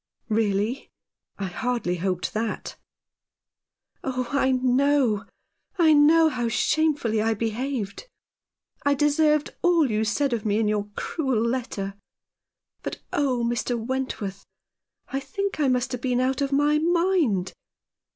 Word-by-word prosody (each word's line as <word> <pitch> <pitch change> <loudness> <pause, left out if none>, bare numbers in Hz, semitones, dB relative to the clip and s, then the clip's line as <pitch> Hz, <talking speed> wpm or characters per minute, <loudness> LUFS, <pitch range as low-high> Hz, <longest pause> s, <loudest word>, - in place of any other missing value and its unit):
" - - -46
Really? 215 +3 0 0.5
I 200 - -3
hardly 190 -1 -2
hoped 180 0 -2
that." 220 0 -3 0.6
" - - -66 0.5
Oh, 255 -2 -2
I 275 -1 +2
know, 255 -3 +2 0.5
I 325 -3 +5
know 315 +2 +6
how 245 -6 -1
shamefully 280 -4 +1
I 225 0 +1
behaved. 230 - -3 0.8
I 285 0 +3
deserved 300 +1 +2
all 335 -7 +3
you 215 +1 +1
said 245 +5 0
of 225 -3 -2
me 210 -1 +1
in 220 -1 +1
your 210 -1 -1
cruel 265 -8 -1
letter. 230 -5 -3 0.9
But - - -5
oh, 260 -4 +1
Mr. 240 +1 -1
Wentworth, 230 -5 -4 0.7
I 270 - -2
think 395 +8 -4
I 290 - +3
must 250 -2 +1
have 250 -2 -4
been 250 -1 0
out 260 +1 0
of 280 0 0
my 295 +2 +3
mind. 335 - +1
255 Hz, 135 wpm, -25 LUFS, 220-290 Hz, 0.9 s, know